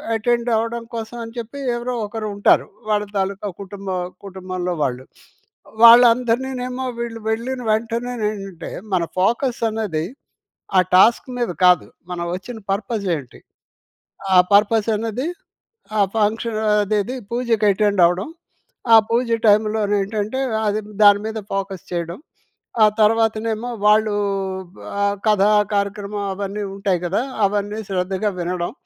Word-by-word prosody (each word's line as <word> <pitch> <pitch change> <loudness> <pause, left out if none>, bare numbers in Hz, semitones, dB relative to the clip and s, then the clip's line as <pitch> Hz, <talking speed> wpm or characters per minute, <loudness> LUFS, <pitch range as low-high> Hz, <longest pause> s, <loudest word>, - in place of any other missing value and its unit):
Attend 235 +2 0
అవ్వడం 230 +1 -2
కోసం 225 +1 -6
అని 230 +1 -10
చెప్పి 235 +5 -7 0.2
ఎవరో 245 +1 -3
ఒకరు 215 0 -5
ఉంటారు. 200 - +3 0.2
వాళ్ళ 210 -1 +2
తాలూకా 195 +1 -2
కుటుంబ 200 0 -9 0.4
కుటుంబంలో 185 -2 -4
వాళ్ళు. 130 -1 -2 0.8
వాళ్ళందరినీ 240 +1 +6 0.2
ఏమో 255 +1 -4
వీళ్ళు 235 -1 -4
వెళ్ళిన 245 +4 -2
వెంటనే 230 +3 -1 0.2
ఏంటంటే, 195 -5 -7 0.2
మన 180 -2 +2 0.2
ఫోకస్ 235 +6 +1
అనేది, 200 -8 -2 0.7
ఆ - - +8 0.2
టాస్క్ 225 +8 +5
మీద 240 -5 0
కాదు 180 -2 +5 0.3
మనం 175 -1 -3
వచ్చిన 210 +6 -8
పర్పస్ 200 +1 -2
ఏంటి? 135 -4 -12 0.9
ఆ - - +6 0.2
పర్పసనేది, 220 +4 +2 0.7
ఆ - - +2 0.2
ఫంక్షన్ 220 +1 0
అదేది 210 +3 +1
పూజకి 235 -3 0
అటెండ్ 200 -1 +1
అవ్వడం. 180 +3 0 0.7
ఆ - - +11
పూజ 235 +2 +1 0.2
టైమ్‌లో 215 +1 +3
నేంటంటే, 205 +4 -1 0.3
అది 210 +1 0 0.2
దాని 205 0 +7
మీద 220 0 -4 0.2
ఫోకస్ 195 -2 -3
చేయడం. 170 0 -4 0.6
ఆ - - +9 0.2
తర్వాతనేమో 225 +1 +1 0.2
వాళ్ళు, 210 0 +4 0.9
ఆ - - +2 0.2
కథా 210 -1 +4 0.2
కార్యక్రమం 200 0 -2
అవన్నీ 200 +1 -4
ఉంటాయి 195 -2 0
గదా! 190 +6 0 0.2
అవన్నీ 205 +1 -1
శ్రద్ధగా 190 +2 -1
వినడం. 175 0 -2
210 Hz, 125 wpm, -20 LUFS, 195-230 Hz, 0.9 s, ఆ